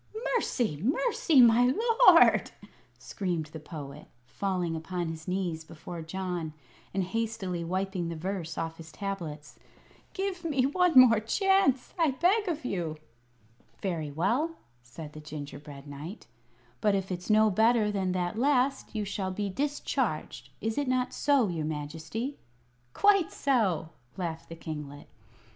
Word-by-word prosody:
"Mercy! 225 Hz, -, 0 dB
mercy, 335 Hz, -, +3 dB
my 240 Hz, +1 st, +6 dB, 0.4 s
lord!" -, -, +7 dB, 0.5 s
screamed 175 Hz, -6 st, -3 dB
the 160 Hz, -, -6 dB
Poet, 150 Hz, -2 st, -9 dB, 0.2 s
falling 175 Hz, +4 st, -2 dB
upon 170 Hz, +1 st, -3 dB
his 160 Hz, -1 st, -7 dB
knees 180 Hz, -3 st, -2 dB
before 165 Hz, +1 st, -8 dB
John 175 Hz, -1 st, -4 dB, 0.4 s
and 195 Hz, -1 st, 0 dB
hastily 190 Hz, -3 st, -2 dB
wiping 185 Hz, 0 st, -2 dB
the 170 Hz, -, -4 dB
verse 170 Hz, -1 st, -4 dB
off 165 Hz, 0 st, -3 dB
his 160 Hz, -1 st, -11 dB
tablets, 170 Hz, -7 st, -6 dB, 0.5 s
"give 385 Hz, -2 st, -3 dB
me 280 Hz, -6 st, +1 dB
one 350 Hz, +2 st, +3 dB
more 230 Hz, -4 st, +7 dB
chance, 275 Hz, -, +2 dB
I 325 Hz, -2 st, +4 dB
beg 365 Hz, -, +2 dB
of 315 Hz, -6 st, -2 dB
you!" 170 Hz, -8 st, -2 dB, 0.9 s
"Very 165 Hz, -6 st, -2 dB
well," 245 Hz, -, 0 dB, 0.3 s
said 145 Hz, +5 st, -10 dB
the 155 Hz, -, -9 dB
gingerbread 145 Hz, -1 st, -8 dB
knight. 150 Hz, +8 st, -8 dB, 0.6 s
"But 210 Hz, -2 st, +3 dB
if 195 Hz, -1 st, -2 dB
it's 180 Hz, +2 st, -5 dB
no 215 Hz, 0 st, +5 dB
better 220 Hz, +1 st, +3 dB
than 190 Hz, -2 st, -1 dB
the 175 Hz, -1 st, 0 dB
last 265 Hz, +1 st, +1 dB
you 210 Hz, -1 st, -1 dB
shall 195 Hz, -1 st, -3 dB
be 200 Hz, +1 st, -3 dB
discharged. 290 Hz, +7 st, -2 dB
Is 225 Hz, +4 st, -1 dB
it 285 Hz, -, -1 dB
not 255 Hz, 0 st, 0 dB
so, 280 Hz, -6 st, +3 dB
your 165 Hz, -4 st, -2 dB
Majesty?" 160 Hz, -, -4 dB, 0.5 s
"Quite 400 Hz, -4 st, +4 dB
so," 210 Hz, -, +1 dB, 0.3 s
laughed 165 Hz, -3 st, -4 dB
the 165 Hz, -, -7 dB
kinglet. 150 Hz, -3 st, -7 dB
190 Hz, 140 wpm, -29 LUFS, 160-250 Hz, 0.9 s, lord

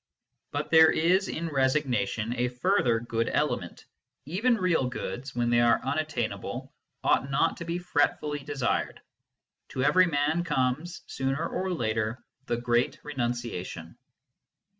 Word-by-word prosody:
But -, -, -4 dB
there 160 Hz, -1 st, +8 dB
is 185 Hz, +4 st, +2 dB
in 165 Hz, +1 st, -3 dB
resignation 130 Hz, -6 st, 0 dB
a 125 Hz, 0 st, +1 dB
further 125 Hz, -, +1 dB
good 115 Hz, -1 st, -1 dB
element: -, -, -2 dB, 0.4 s
even 210 Hz, -, +2 dB
real 180 Hz, -, +1 dB
goods, 125 Hz, +1 st, -5 dB
when 120 Hz, 0 st, +1 dB
they 120 Hz, 0 st, +4 dB
are 120 Hz, 0 st, +4 dB
unattainable, 130 Hz, -8 st, -3 dB, 0.3 s
ought 130 Hz, -, +2 dB
not 135 Hz, -, +1 dB
to 170 Hz, -, -6 dB
be 170 Hz, +1 st, -2 dB
fretfully 150 Hz, -3 st, 0 dB
desired. 140 Hz, -2 st, -2 dB, 0.7 s
To 130 Hz, -, -2 dB
every 180 Hz, +6 st, +5 dB
man 155 Hz, +2 st, +1 dB
comes, 150 Hz, +2 st, -1 dB
sooner 135 Hz, +5 st, -2 dB
or 190 Hz, 0 st, -2 dB
later, 110 Hz, -5 st, -1 dB, 0.3 s
the 120 Hz, -, 0 dB
great 120 Hz, +1 st, +1 dB
renunciation. 120 Hz, -, -4 dB
135 Hz, 130 wpm, -28 LUFS, 120-160 Hz, 0.7 s, there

